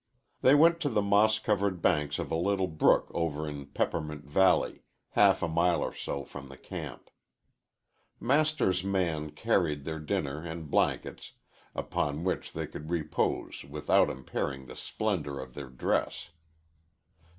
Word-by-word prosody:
They 130 - +6
went 165 +3 +6
to 150 -4 0
the 105 -5 +1
moss 105 +2 +4
covered 100 -4 0
banks 75 -3 +1
of - - -4
a - - +1
little 95 +3 +1
brook 80 -3 +3
over 80 -2 -1
in 70 -2 -6
Peppermint 75 +1 -2
Valley, 90 +5 +3 0.3
half - - +4
a - - +2
mile 85 +2 +2
or - - -3
so 70 - -4
from 70 -1 -10
the 65 - -11
camp. - - -8 1.1
Master's 140 -8 +2
man 85 -6 0
carried 75 -2 0
their 80 0 -4
dinner 75 0 -2
and 80 -2 -6
blankets, - - 0 0.4
upon 75 +2 -2
which 95 - -2
they - - -3
could 75 +1 -9
repose 80 -3 -1
without - - +2
impairing 65 +1 -4
the - - -10
splendor 80 -11 -2
of 65 -1 -8
their 70 -1 -7
dress. 65 - -1
80 Hz, 145 wpm, -30 LUFS, 75-100 Hz, 1.1 s, They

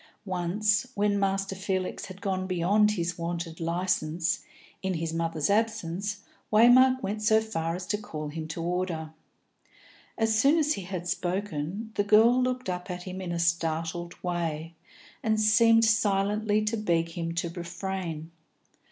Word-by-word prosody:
Once, 200 +5 0
when 205 0 +2
Master 195 0 0
Felix 190 -1 -3
had 190 0 -11
gone 185 -1 -1
beyond 200 +4 +3
his 175 -2 -2
wonted 170 0 -4
licence, 170 -1 0 0.4
in 190 -1 -1
his 165 0 -3
mother's 165 -2 -1
absence, 205 -2 -1 0.3
Waymark 255 +4 +6
went 210 +2 -2
so 220 +1 +4
far 165 -7 -2
as 180 0 -6
to 210 +1 -1
call 155 -7 -6
him 155 +1 -5
to 165 +1 -5
order. 170 -3 -2 1.0
As 225 -1 +2
soon 275 +8 +4
as 305 -1 +2
he 200 - -5
had 180 -2 -5
spoken, 185 +2 -3
the 205 - +1
girl 225 +5 +5
looked 255 -1 -1
up 180 +1 -4
at 180 0 -5
him 185 0 -6
in 180 -2 -4
a 170 - -2
startled 170 0 -1
way, 165 -2 -2 0.5
and 220 -1 +1
seemed 225 +1 +5
silently 210 0 +2
to 225 +2 0
beg 170 -5 +1
him 165 0 -4
to 170 0 -1
refrain. 170 -2 -5
185 Hz, 150 wpm, -28 LUFS, 170-210 Hz, 1.0 s, Waymark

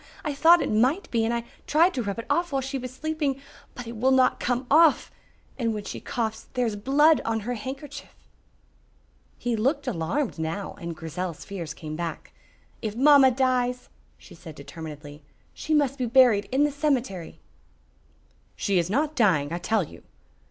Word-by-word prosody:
I 300 - -1
thought 330 +5 +5
it - - -2
might 255 - +1
be 230 -2 +1
and 225 - 0
I 235 0 -1 0.2
tried 335 +5 +4
to 255 - -2
rub 200 -2 -3
it 230 - -5
off 345 -1 0
while 270 -1 0
she 270 +1 -3
was 255 0 -6
sleeping, 295 0 -2 0.4
but 245 - -7
it 230 +1 -7
will 245 +4 +2
not 260 -1 +3
come 245 +1 -1
off. 320 +1 +5 0.5
And 230 -3 0
when 210 - -5
she - - -6
coughs 225 -2 -4
there 250 -1 +1
is 220 -3 -2
blood 285 +8 +4
on 225 -1 -1
her 245 +4 -3
handkerchief." 265 +5 -8 1.2
He 240 -1 -1
looked 255 +9 0
alarmed 210 - -2
now, 165 +5 -3
and 170 -1 -5
Grizel's 165 +1 -5
fears 170 -5 -6
came 155 -1 -7
back. 170 0 -6 0.5
"If 215 -2 -4
mamma 275 +1 +7
dies," 250 -1 0 0.3
she 65 - -15
said 165 -2 -11
determinedly, 150 0 -9 0.3
"she 315 - -7
must 280 -2 +1
be 250 - 0
buried 235 -5 +4
in 270 +3 +3
the 295 - +2
cemetery." 260 - -2 1.2
"She 195 -3 +1
is 170 +1 -1
not 295 +8 0
dying, 165 - +2
I 170 - -2
tell 210 +3 +1
you." - - -12
240 Hz, 180 wpm, -25 LUFS, 190-275 Hz, 1.2 s, mamma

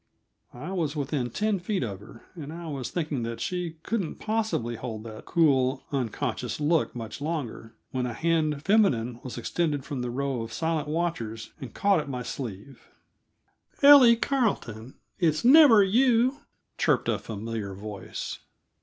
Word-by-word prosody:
I 150 +9 -6
was 165 -5 -1
within 140 -3 -2
ten 210 - 0
feet 190 0 -2
of 100 -5 -4
her, 110 +2 -14
and 155 -4 -8
I 170 +1 -7
was 140 -5 -4
thinking 155 -6 -2
that 115 0 -4
she 180 -3 -3
couldn't 205 -8 -2
possibly 215 - -1
hold 110 -2 -6
that 110 -1 -9
cool, 135 -5 +2
unconscious 130 -1 -2
look 155 0 +1
much 115 +1 -7
longer, 145 -8 -4 0.2
when 125 -1 -1
a 120 - -4
hand 155 -1 0
feminine 125 - +2
was 130 - -7
extended 145 +2 -1
from 140 -4 -4
the 125 - -3
row 135 0 -2
of 115 0 -7
silent 160 0 -1
watchers 150 -9 -3
and 130 - -8
caught 200 -3 +3
at 150 -2 -5
my 125 -2 -4
sleeve. 120 0 -7 0.9
"Ellie 275 -5 +9
Carleton, 195 - -1 0.2
it's 160 +1 +1
never 260 -6 +8
you!" 245 +5 +3 0.4
chirped - - +2
a - - +1
familiar 110 -2 -5
voice. 105 0 -6
145 Hz, 155 wpm, -27 LUFS, 120-180 Hz, 0.9 s, Ellie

